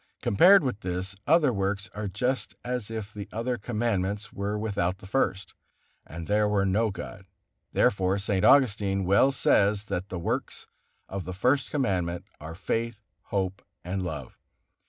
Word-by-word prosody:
Compared 180 - +6
with 125 -6 -2
this, 90 0 -4
other 150 -4 +4
works 100 0 -1
are 105 0 -4
just 125 +7 -2
as 125 -3 -3
if 110 -2 -5
the 100 -1 -7
other 115 +3 -1
Commandments 105 -2 -2
were 100 +2 -2
without 100 -4 -1
the 95 - -14
First, 95 -4 -1 0.5
and 80 +1 -7
there 105 +2 +2
were 100 -1 +2
no 105 +4 +2
God, 95 0 -8 0.4
Therefore 95 0 +2
St. 100 -2 0
Augustine 100 -8 +4
well 100 +9 +5
says 105 -5 +3
that 95 -2 -4
the 90 - -4
works 85 - -3 0.4
of 95 -1 -4
the 90 +2 -6
First 125 +7 +2
Commandment 95 - -1
are 80 +2 -8
faith, 115 +3 -3 0.2
hope 95 -1 -2 0.2
and 95 +2 -3
love. 80 -5 -6
100 Hz, 155 wpm, -27 LUFS, 95-115 Hz, 0.5 s, Compared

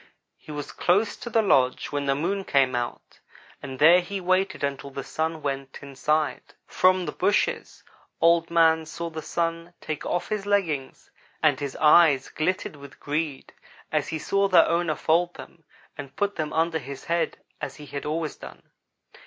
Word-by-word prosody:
He - - -13
was 145 -1 -6
close 205 +4 +1
to 235 - -7
the 225 -1 +2
lodge 130 -10 +2
when 145 -1 -2
the 135 - +2
Moon 190 +7 -1
came 135 -6 +2
out, 120 -1 -5 0.4
and 135 -2 -7
there 170 +5 +7
he 195 +3 -5
waited 185 -1 0
until 140 0 -3
the 135 0 -6
Sun 160 0 -3
went 135 -1 -4
inside. 140 +3 -2
From 185 0 +3
the - - -3
bushes 200 +3 -1 0.4
Old 165 0 +4
man 160 -1 +3
saw 170 +1 -5
the 160 0 -6
Sun 165 +2 -3
take 155 -2 -5
off 175 - -2
his 210 -2 -3
leggings 165 -10 -1 0.3
and - - +3
his 140 -2 -4
eyes 150 -3 +5
glittered 170 -1 -2
with 140 -1 -13
greed 150 -1 -3 0.4
as - - 0
he 160 - -3
saw 195 +5 +1
their 185 - +6
owner 170 -2 +1
fold 170 +2 +1
them 165 -2 -13 0.3
and 140 -2 -9
put 205 0 -1
them 155 -2 -3
under 160 0 +1
his 140 0 -9
head 170 0 -1 0.2
as - - -5
he 150 - -11
had 140 0 -6
always 155 0 -3
done. - - -13
160 Hz, 175 wpm, -25 LUFS, 140-175 Hz, 0.4 s, there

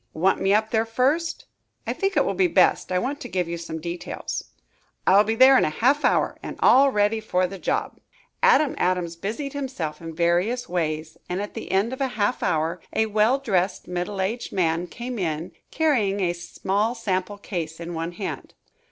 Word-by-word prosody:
"Want 185 +5 +2
me 195 - +2
up 215 +1 +2
there 225 0 +1
first?" 275 +9 0 0.4
"I - - -1
think 390 0 -1
it - - +4
will - - 0
be 375 -2 +3
best. 325 - +3
I 185 - +2
want 275 +9 -2
to - - -7
give 180 -1 -1
you 170 - -3
some 165 -1 -6
details." 170 +2 -5 0.6
"I'll 195 +2 +6
be 220 +1 -1
there 260 +2 +7
in - - +2
half 255 - +2
an - - +6
hour - - 0
and - - -6
all 275 +2 +6
ready 210 0 +2
for 185 -4 0
the 190 +1 -6
job." - - -2 0.4
Adam 390 - +5
Adams 180 -2 0
busied 225 - -4
himself 220 - -4
in 165 -1 -7
various 180 +9 +1
ways, 160 -2 -2
and 180 +1 -2
at 205 +1 -5
the - - -6
end 200 +6 +1
of 260 - -6
half 245 -3 0
an - - +1
hour, 160 +3 -1
a 220 - +2
well 215 +4 +3
dressed, 190 -8 -1
middle 180 +2 -3
aged 220 +6 -2
man 170 -1 0
came 240 +5 -6
in, 160 -1 -2 0.2
carrying 235 -11 +1
a 175 -3 +1
small 200 +6 -2
sample 200 -3 -2
case 170 -5 -5
in 170 0 -6
one 165 +1 -4
hand. 195 +2 -6
195 Hz, 195 wpm, -24 LUFS, 175-245 Hz, 0.6 s, there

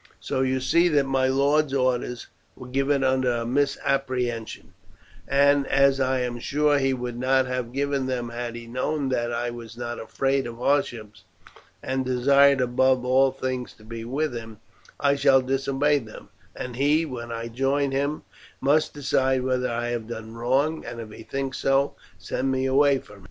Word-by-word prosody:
So 130 - -2
you 130 0 +1
see 170 +7 +3
that 145 -4 +2
my 135 -1 +1
lord's 140 +2 +2
orders 125 -2 0 0.3
were 125 - -10
given 135 +2 +1
under 130 -1 +2
a 115 -1 -2
misapprehension, 130 -5 -1 0.5
and 140 0 +3
as 135 0 +3
I 130 -1 +1
am 120 -1 -3
sure 145 +3 +2
he 135 -1 +1
would 125 -2 -4
not 130 +1 +2
have 125 -2 -3
given 140 0 -1
them 125 -2 -2
had 120 0 -5
he 120 0 -8
known 135 +4 -2
that 120 -2 -1
I 120 +1 -2
was 115 -1 -10
not 120 -1 -5
afraid 135 +3 -1
of 115 -1 -8
hardships, 115 -7 -1 0.6
and 130 0 -1
desired 140 +2 +4
above 125 +1 +2
all 130 +1 +4
things 130 -1 -4
to 110 - -20
be 115 +1 -7
with 135 +4 -2
him, 115 -2 -8 0.4
I 140 -1 +3
shall 140 -1 +5
disobey 135 +2 +1
them, 110 -4 -12 0.3
and 125 -1 -6
he, 150 +4 +3
when 120 -5 -6
I 115 0 -4
join 135 +3 0
him, 140 +3 -1 0.4
must 150 +4 +2
decide 135 -2 +1
whether 125 -1 0
I 120 0 -2
have 120 -2 -3
done 110 -1 -7
wrong, 135 +7 0
and, 120 0 -7
if 110 -2 -8
he - - -11
thinks 135 -1 -4
so, 135 +1 +2 0.2
send 135 +1 -2
me 130 0 0
away 140 +1 +4
from 105 -5 -12
him." - - -16
130 Hz, 180 wpm, -25 LUFS, 120-140 Hz, 0.6 s, shall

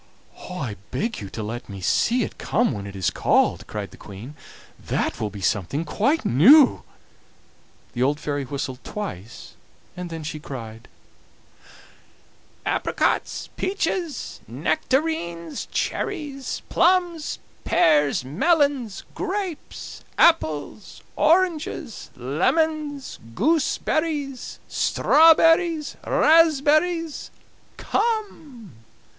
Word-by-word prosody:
"'I 135 - -5
beg 230 - -3
you 100 - -7
to 110 - -6
let 120 +3 -6
me 100 -1 -7
see 235 - +2
it - - -7
come 240 +3 +1
when 100 -3 -5
it 100 - -9
is 95 -2 0
called,' - - +1
cried - - -5
the - - -14
Queen; 105 +8 -10 0.5
'that - - -2
will 105 - -1
be 100 -1 -9
something 105 - -1
quite 270 - 0
new.' 250 - +6 1.1
The 120 - -3
old 145 +3 +2
fairy 145 -2 -2
whistled 130 -1 -5
twice, 120 - -7 0.4
then 170 -3 -6
she 155 0 -5
cried: 115 -6 -8 1.8
"'Apricots, - - -1
peaches, 330 - -2
nectarines, 170 - -2
cherries, 295 -8 -3
plums, 345 -3 +2 0.3
pears, 145 -5 +3
melons, 270 - +1
grapes, 380 -4 -5
apples, 195 - +1
oranges, 330 - +1
lemons, 290 - -1 0.2
gooseberries, 295 0 0
strawberries, 325 0 +4
raspberries, 320 +1 +3 0.5
come! 320 - -3
240 Hz, 95 wpm, -23 LUFS, -, 1.8 s, new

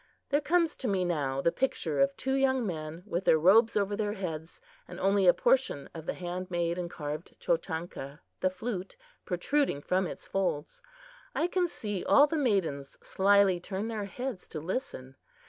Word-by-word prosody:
There 290 +1 +2
comes 335 +1 +2
to 260 - -3
me 190 -3 +1
now 140 -6 -1
the 170 - +3
picture 165 - -1
of 140 0 +3
two 265 - -1
young 265 -2 +2
men 160 -2 -5
with 190 -3 -3
their 160 - +6
robes 210 +8 +5
over 205 0 +1
their 210 -1 -1
heads, 165 -5 -6 0.3
and - - -9
only 195 -1 +3
a 175 - +8
portion 245 - +1
of 160 -1 -9
the - - -1
hand 180 +1 -5
made 170 0 -1
and 175 -1 -3
carved 150 0 -6
chotanka, 165 - -3 0.2
the 185 - +2
flute, 195 - -5 0.3
protruding 205 - 0
from 185 +5 0
its - - -8
folds. 180 -6 -2 0.5
I - - +2
can 355 0 +1
see 205 - -4
all 285 - +6
the 300 - -3
maidens 190 - 0
slyly 195 -1 +4
turn 195 +4 -4
their 215 -3 -3
heads 245 0 -5
to 155 - -6
listen. 150 - -5
185 Hz, 180 wpm, -30 LUFS, 165-230 Hz, 0.5 s, a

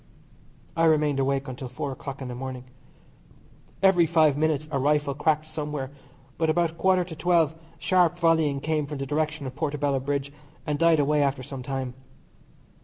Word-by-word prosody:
I 165 0 +3
remained 150 -3 +3
awake 135 +1 0
until 130 +1 -6
four 130 +3 -4
o'clock 135 0 -7
in - - -5
the 125 - -5
morning. 130 0 -6 1.2
Every 180 -3 +5
five 155 -3 +4
minutes 155 0 0
a 140 - 0
rifle 145 +1 +1
cracked 155 +2 0
somewhere, 150 -3 -4 0.5
but 160 -1 +2
about 170 0 +2
a - - -17
quarter 185 +2 +2
to 170 -2 -8
twelve 165 -2 +2 0.2
sharp 175 -2 +2
volleying 160 -5 +2
came 155 -1 -1
from 150 0 -5
the 135 - -3
direction 155 +1 -2
of 130 -1 -6
Portobello 145 -2 0
Bridge, 140 +1 -3 0.3
and 150 -1 -1
died 165 -2 +4
away 145 +1 +2
after 140 -2 0
some 135 +1 -7
time. 130 -1 -4
150 Hz, 175 wpm, -26 LUFS, 135-160 Hz, 1.2 s, Every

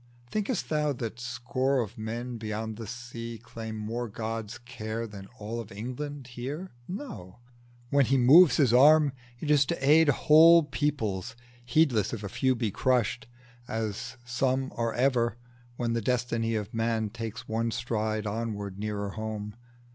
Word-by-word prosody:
Think'st 215 +1 -1
thou 150 -2 +1
that 115 -2 -5
score 130 +3 -1
of 115 -2 -3
men 115 +2 -5
beyond 110 0 -4
the 115 -2 -7
sea 115 0 -7
Claim 110 -1 -7
more 115 +3 -3
God's 110 0 -4
care 115 -1 -5
than 100 -3 -10
all 110 +2 -5
of 115 - -8
England 130 +7 -5
here? 135 +9 -6 0.2
No: 190 - -7 0.5
when 140 -3 +4
he 135 - +3
moves 135 +3 +7
His 130 -6 +4
arm, 150 +3 +7 0.3
it 150 - -1
is 145 -1 +6
to 135 - -1
aid 155 +1 +6
Whole 160 +4 +7
peoples, 115 -10 -2 0.3
heedless 120 -5 +2
if 110 -3 -5
a 100 - -4
few 130 +5 +1
be 115 -3 -1
crushed, 125 +2 +1 0.4
As 110 +1 -4
some 130 +2 0
are 115 -1 0
ever, 120 -3 +2 0.4
when 120 -1 -1
the 115 - 0
destiny 115 -1 0
Of 105 -1 -4
man 115 -2 0
takes 115 +1 -6
one 115 +1 0
stride 110 -2 -2
onward 105 -2 -4
nearer 100 -1 -3
home. 110 -1 -5
115 Hz, 155 wpm, -28 LUFS, 110-130 Hz, 0.5 s, moves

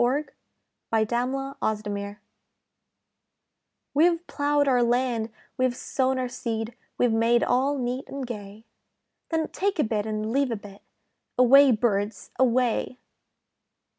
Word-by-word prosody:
THE 265 +5 +2 0.6
BIRD 220 -1 +2
SCARER'S 250 -1 -2
SONG 205 0 -5 1.8
We've 335 +3 +3
ploughed 290 0 +1
our 250 -2 +4
land, 240 -2 +1 0.3
we've 255 -1 +2
sown 260 +1 0
our 255 -1 -1
seed, 225 -1 -4 0.2
We've 245 -2 +3
made 230 +1 +3
all 275 +3 +1
neat 250 +1 -2
and 275 -1 -5
gay; 210 -2 -8 0.6
Then 320 -1 -1
take 395 0 -1
a 305 - +3
bit 215 -1 -1
and 215 0 -2
leave 275 +1 +2
a 230 - -1
bit, 205 -1 -12 0.6
Away, 270 +3 +7
birds, 210 -2 -1
away! 250 -1 +1
245 Hz, 125 wpm, -26 LUFS, 220-270 Hz, 1.8 s, Away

